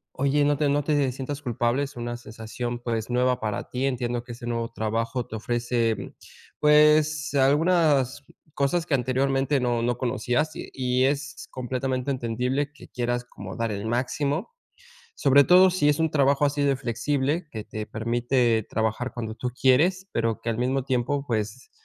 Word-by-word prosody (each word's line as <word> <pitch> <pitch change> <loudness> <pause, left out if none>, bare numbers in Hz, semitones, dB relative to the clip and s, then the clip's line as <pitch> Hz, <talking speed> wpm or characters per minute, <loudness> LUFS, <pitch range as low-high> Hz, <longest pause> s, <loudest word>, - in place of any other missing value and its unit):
Oye, 140 +2 +2
no 145 0 +2
te 145 0 +1
no 145 0 +1
te, 145 -2 +2
eh, 130 - -1
sientas 135 +3 -5
culpable. 120 0 0
Es 140 -1 -4
una 120 0 -4
sensación, 120 +2 -6
pues, 115 -1 -3
nueva 125 +1 +1
para 105 -2 -3
ti. 130 +2 -1
Entiendo 120 -2 -2
que 120 -1 -8
ese 120 0 -9
nuevo 115 -1 -2
trabajo 115 +2 -2
te - - -8
ofrece, 120 0 0
mm, - - -8 0.5
pues, 150 -1 +4
algunas 145 -1 +3 0.3
cosas 145 +5 0
que 160 - -3
anteriormente 135 +2 +1
no 120 -2 0
no 120 0 0
conocías, 125 +4 0
y - - -7
y 130 0 +1
es 145 +2 -2
completamente 130 +1 -2
entendible 125 +3 -1
que 150 - -15
quieras 120 0 -2
como 100 -4 -9
dar 115 -1 -1
el 100 +2 -4
máximo, 140 - -1 0.6
sobre 140 +1 +5
todo 185 +3 +7
si 160 -5 +2
es 145 - 0
un 160 -1 +1
trabajo 140 0 +3
así 145 0 -1
de 140 -1 +2
flexible 140 +6 -1
que 110 -2 -5
te 110 0 -5
permite 115 +1 +1
trabajar 110 +3 -1
cuando 110 -2 -5
tú 125 +1 -3
quieres, 160 +10 +2
pero 115 -1 -1
que 115 - -5
al 115 - 0
mismo 130 +2 0
tiempo, 140 +2 -1
pues, 110 +1 -3
130 Hz, 175 wpm, -25 LUFS, 120-145 Hz, 0.6 s, todo